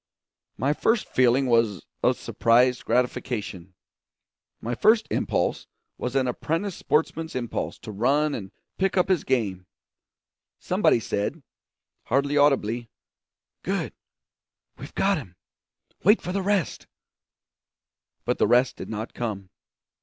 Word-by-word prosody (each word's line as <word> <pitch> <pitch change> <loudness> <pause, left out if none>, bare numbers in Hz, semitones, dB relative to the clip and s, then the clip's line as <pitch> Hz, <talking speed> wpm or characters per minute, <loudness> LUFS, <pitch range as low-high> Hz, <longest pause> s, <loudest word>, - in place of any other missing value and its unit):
My 140 +3 +1
first 225 +8 +1
feeling 130 +1 +3
was 115 -6 +2 0.2
of - - +3
surprised 125 +2 +2
gratification; 110 -6 -2 0.8
my 120 - -3
first 220 - +4
impulse - - 0 0.3
was 125 +1 -3
an 130 -1 +2
apprentice 165 +10 -2
sportsman's 160 0 -1
impulse 120 -2 -3
to 110 - -9
run 140 +8 +2
and 95 -6 -6 0.3
pick 190 0 +1
up 180 +1 +3
his 185 -4 +2
game. 100 -9 -1 0.9
Somebody - - +2
said, 115 +8 -3 0.6
hardly 140 +3 +1
audibly, 120 -5 +2 0.7
'Good - - -2 0.8
we've - - -11
got 195 -3 +2
him! 95 - -12 0.7
wait 210 +4 +6
for 180 - -5
the 195 +1 -1
rest.' 195 -3 -1 1.4
But - - 0
the - - +4
rest 125 +2 +3
did - - -7
not 110 +1 -5
come. 100 -5 -4
125 Hz, 120 wpm, -25 LUFS, 115-155 Hz, 1.4 s, wait